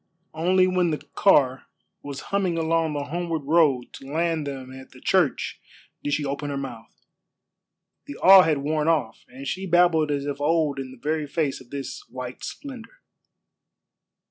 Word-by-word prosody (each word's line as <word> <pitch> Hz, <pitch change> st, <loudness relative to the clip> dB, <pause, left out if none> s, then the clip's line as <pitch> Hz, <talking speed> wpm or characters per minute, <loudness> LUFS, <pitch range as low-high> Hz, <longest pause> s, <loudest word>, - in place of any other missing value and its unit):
Only 180 Hz, +4 st, +3 dB
when 185 Hz, -1 st, +2 dB
the 155 Hz, -, -1 dB, 0.2 s
car 135 Hz, -9 st, +3 dB, 0.3 s
was 140 Hz, -1 st, -7 dB
humming 190 Hz, -4 st, +1 dB
along 165 Hz, -1 st, +1 dB
the 145 Hz, -1 st, -2 dB
homeward 165 Hz, +1 st, -3 dB
road 145 Hz, -4 st, +2 dB
to 135 Hz, +1 st, -10 dB
land 165 Hz, -1 st, 0 dB
them 130 Hz, -2 st, -7 dB
at 130 Hz, 0 st, -11 dB
the 130 Hz, -, -16 dB
church 175 Hz, -5 st, +1 dB, 0.4 s
did 145 Hz, 0 st, +1 dB
she 150 Hz, -, -2 dB
open 140 Hz, +1 st, -3 dB
her 140 Hz, -, -3 dB
mouth. 120 Hz, -5 st, -9 dB, 1.0 s
The 145 Hz, -, -7 dB
awe 190 Hz, 0 st, +9 dB
had 160 Hz, -4 st, +2 dB
worn 150 Hz, +2 st, -1 dB
off, 150 Hz, -9 st, 0 dB
and 135 Hz, +2 st, -9 dB
she 190 Hz, +5 st, -3 dB
babbled 170 Hz, -3 st, +4 dB
as 140 Hz, -1 st, -1 dB
of 145 Hz, 0 st, -4 dB
old 150 Hz, -2 st, +1 dB
in 135 Hz, -1 st, -5 dB
the 130 Hz, -, -12 dB
very 150 Hz, +3 st, -2 dB
face 145 Hz, -3 st, -1 dB
of 125 Hz, -, -16 dB
this 140 Hz, -1 st, -6 dB
white 125 Hz, -1 st, -7 dB
splendor. 275 Hz, -, -9 dB
150 Hz, 170 wpm, -24 LUFS, 140-170 Hz, 1.0 s, awe